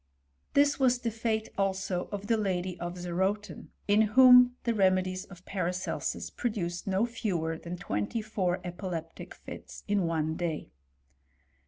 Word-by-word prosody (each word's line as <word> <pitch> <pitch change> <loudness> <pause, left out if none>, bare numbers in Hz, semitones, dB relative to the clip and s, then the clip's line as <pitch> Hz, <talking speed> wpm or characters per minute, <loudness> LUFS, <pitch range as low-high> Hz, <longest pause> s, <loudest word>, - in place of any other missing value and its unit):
This 285 0 +4
was 255 -2 +4
the 240 -2 -2
fate 220 0 -1
also 190 -2 -1
of 205 0 -4
the 225 - +2
lady 185 -4 -1
of 175 +1 -5
Zerotin, 190 +4 -2 0.2
in 205 +1 +5
whom 250 +2 +7
the 235 - +1
tvmedies 185 -2 +1
of 185 -2 -14
Paracelsus 180 -1 -2
produced 180 -8 -3
no 195 +3 +2
fewer 185 -9 -2
than 170 +2 -7
twenty 105 - -2
four 185 -4 -1
epileptic 175 -2 -6
fits - - -10
in 200 -4 +1
one 160 -1 0
day. 165 -3 -3
190 Hz, 140 wpm, -29 LUFS, 175-220 Hz, 0.2 s, whom